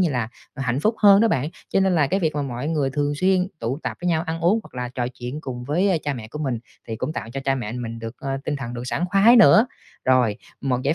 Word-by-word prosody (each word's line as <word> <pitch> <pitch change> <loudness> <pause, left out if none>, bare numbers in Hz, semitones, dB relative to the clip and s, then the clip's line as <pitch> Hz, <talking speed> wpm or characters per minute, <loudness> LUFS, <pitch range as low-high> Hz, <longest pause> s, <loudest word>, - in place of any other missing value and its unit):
như 175 -4 +3
là, 120 -4 -1 0.3
ờ, 135 - -5
hạnh 125 +1 0
phúc 215 +8 +2
hơn 200 -1 +8
đó 230 - +4
bạn. 140 - 0 0.2
Cho 195 - +2
nên 190 -1 +3
là 155 -4 +3
cái 190 +7 0
việc 155 -3 0
mà 145 - -1
mọi 130 +1 -4
người 150 -4 0
thường 145 +1 0
xuyên 185 +3 +2
tụ 120 +5 -2
tập - - -3
với 180 - -1
nhau 160 -1 +1
ăn 165 0 -4
uống 180 +7 +3
hoặc - - -17
là 125 -1 -3
trò 125 -1 -3
chuyện 125 +3 -7
cùng 125 -5 -6
với, 170 +9 +1
ơ, 180 - +3
cha 145 -1 -2
mẹ 110 -4 -8
của 150 - -8
mình 130 -6 -1 0.3
thì 110 - -3
cũng 140 +7 -3
tạo 115 - -5
cho 135 - -4
cha 135 - +2
mẹ 120 -4 -4
mình 115 -2 -5
được, 115 +1 -7
ơ, 135 - -5
tinh 150 - -1
thần 125 -3 -6
được 120 - -5
sảng 170 - -1
khoái 210 +5 +6
nữa. 225 +1 +7 0.4
Rồi, 125 -5 +3 0.2
một 130 -2 -1
giải 145 +3 +1
140 Hz, 290 wpm, -23 LUFS, 125-170 Hz, 0.4 s, hơn